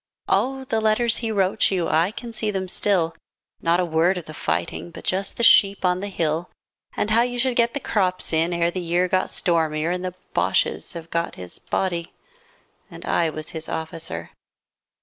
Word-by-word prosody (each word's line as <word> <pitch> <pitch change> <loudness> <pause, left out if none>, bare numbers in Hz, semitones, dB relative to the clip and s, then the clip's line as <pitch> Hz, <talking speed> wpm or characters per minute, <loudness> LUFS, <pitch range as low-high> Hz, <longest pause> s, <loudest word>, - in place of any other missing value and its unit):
Oh, 265 0 +1
the 225 -4 -1
letters 220 +2 +2
he 225 -2 -2
wrote 195 0 +2
you, 185 -3 0
And - - +1
I 165 +3 +3
can 235 +2 -8
see 215 -1 -1
them 190 -2 -2
still. 180 -3 +1 0.5
Not 170 +1 +3
a 180 - +2
word 170 +3 +2
of 175 - -6
the 155 - -9
fighting 85 - -2
But 170 - -11
just 195 +1 -1
the 235 - -1
sheep 200 -4 +6
on 180 0 +2
the 200 - -4
hill 165 -3 -1 0.5
And 210 - 0
how 230 +2 +5
you 245 0 -1
should 250 0 +1
get 235 +1 +2
the - - 0
crops 185 -8 0
in 165 +2 +2
Ere 170 0 +1
the 185 - -3
year 175 +1 +1
got 185 +1 +1
stormier, 160 -2 +1
40 - - +1
And 180 - -6
the 180 -1 -4 0.2
Bosches - - +1
have 165 -1 -9
got 170 0 -1
his 90 -1 -6
body. 175 -2 -2 0.8
And - - -10
I 165 -1 +2
was 155 0 -6
his 160 -1 -5
officer. 160 - -4
180 Hz, 205 wpm, -23 LUFS, 165-210 Hz, 0.8 s, sheep